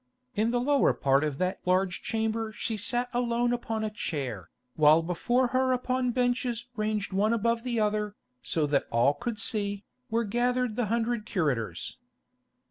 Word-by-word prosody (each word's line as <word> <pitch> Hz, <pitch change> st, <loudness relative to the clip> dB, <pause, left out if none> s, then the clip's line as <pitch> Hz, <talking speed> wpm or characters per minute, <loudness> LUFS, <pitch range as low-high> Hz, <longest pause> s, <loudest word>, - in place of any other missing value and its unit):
In 215 Hz, +2 st, +1 dB
the 245 Hz, +1 st, +1 dB
lower 280 Hz, +3 st, +3 dB
part 135 Hz, +1 st, +2 dB
of 150 Hz, -3 st, -2 dB
that 185 Hz, +3 st, -1 dB
large 185 Hz, 0 st, +1 dB
chamber 220 Hz, 0 st, -1 dB
she 225 Hz, +1 st, -3 dB
sat 240 Hz, +4 st, 0 dB
alone 240 Hz, 0 st, +1 dB
upon 225 Hz, -2 st, -2 dB
a 215 Hz, -, -2 dB
chair, 135 Hz, -, -4 dB, 0.3 s
while 155 Hz, +1 st, +6 dB
before 240 Hz, +9 st, +1 dB
her 260 Hz, 0 st, +2 dB
upon 255 Hz, 0 st, 0 dB
benches 245 Hz, -1 st, 0 dB
ranged 215 Hz, -2 st, -2 dB
one 210 Hz, +4 st, +2 dB
above 230 Hz, +1 st, +1 dB
the 240 Hz, -2 st, -1 dB
other, 210 Hz, -1 st, 0 dB, 0.3 s
so 160 Hz, -2 st, 0 dB
that 145 Hz, -1 st, +1 dB
all 120 Hz, +5 st, +3 dB
could 220 Hz, +10 st, -4 dB
see, 205 Hz, -2 st, -1 dB, 0.3 s
were 230 Hz, +1 st, +1 dB
gathered 245 Hz, +1 st, 0 dB
the 240 Hz, -2 st, 0 dB
hundred 230 Hz, 0 st, -1 dB
curators. 125 Hz, -, -2 dB
220 Hz, 160 wpm, -28 LUFS, 185-240 Hz, 0.3 s, while